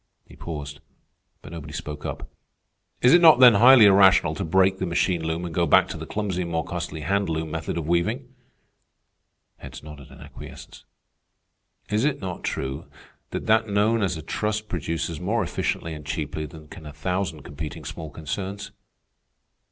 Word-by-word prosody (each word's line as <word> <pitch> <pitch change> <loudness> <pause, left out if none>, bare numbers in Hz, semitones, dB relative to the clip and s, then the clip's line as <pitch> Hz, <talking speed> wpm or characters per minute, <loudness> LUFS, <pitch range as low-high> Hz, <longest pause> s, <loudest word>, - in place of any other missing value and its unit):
He - - -16
paused, 75 -3 -7 0.6
but - - -11
nobody 85 -4 -8
spoke 75 -1 -6
up. - - -6 0.8
"Is 125 - +6
it 175 - +7
not 160 -6 +8
then 125 -2 +9
highly 120 +2 +8
irrational 95 -5 +5
to 100 - -4
break 95 +2 +2
the 95 - -2
machine 85 0 0
loom 80 +2 -3
and 85 - -6
go 85 0 +1
back - - +5
to - - -5
the - - -7
clumsy 100 -4 -3
and 85 - -4
more 80 -1 -2
costly 85 -2 -5
hand 100 +4 0
loom 80 -1 -3
method 80 +1 -4
of 80 -3 -4
weaving?" 110 - -1 1.2
Heads - - -11
nodded 75 -2 -11
in - - -14
acquiescence. - - -12 1.1
"Is 105 +2 +1
it 150 -1 0
not 95 -3 -6
true 65 +4 -4 0.4
that - - -5
that 110 0 +3
known 105 +3 +1
as 95 -4 -1
a 80 - -8
trust 105 +4 -3
produces 85 -1 -3
more 105 +5 0
efficiently 85 -1 -3
and 75 -1 -9
cheaply 75 0 -4
than 75 +1 -13
can 80 0 -11
a 75 - -9
thousand 85 0 -3
competing 75 +1 -8
small 80 -1 -7
concerns?" 95 +7 -6
85 Hz, 175 wpm, -24 LUFS, 80-100 Hz, 1.2 s, then